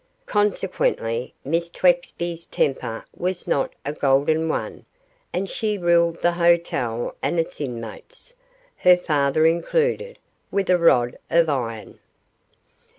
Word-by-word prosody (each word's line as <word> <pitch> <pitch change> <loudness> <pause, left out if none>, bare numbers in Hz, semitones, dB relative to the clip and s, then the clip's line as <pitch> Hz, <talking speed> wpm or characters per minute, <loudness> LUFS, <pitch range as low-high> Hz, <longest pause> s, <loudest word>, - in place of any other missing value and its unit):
Consequently 185 - 0
Miss 165 +4 0
Twexby's 175 -1 0
temper 120 -4 -1
was 180 0 -3
not 135 - +1
a 145 - -2
golden 150 +3 +2
one, - - -3 0.5
and 195 +2 -2
she 220 -4 -2
ruled 170 -2 +2
the 175 - +4
hotel 170 -9 +1
and 170 - 0
its 165 - -3
inmates 125 - -6 0.4
her 180 -1 +6
father 150 -2 +1
included 475 - +1 0.3
with 195 -2 0
a 180 - +5
rod 120 -8 +3
of 165 -1 +4
iron. 115 -6 -3
170 Hz, 115 wpm, -23 LUFS, 140-180 Hz, 0.5 s, her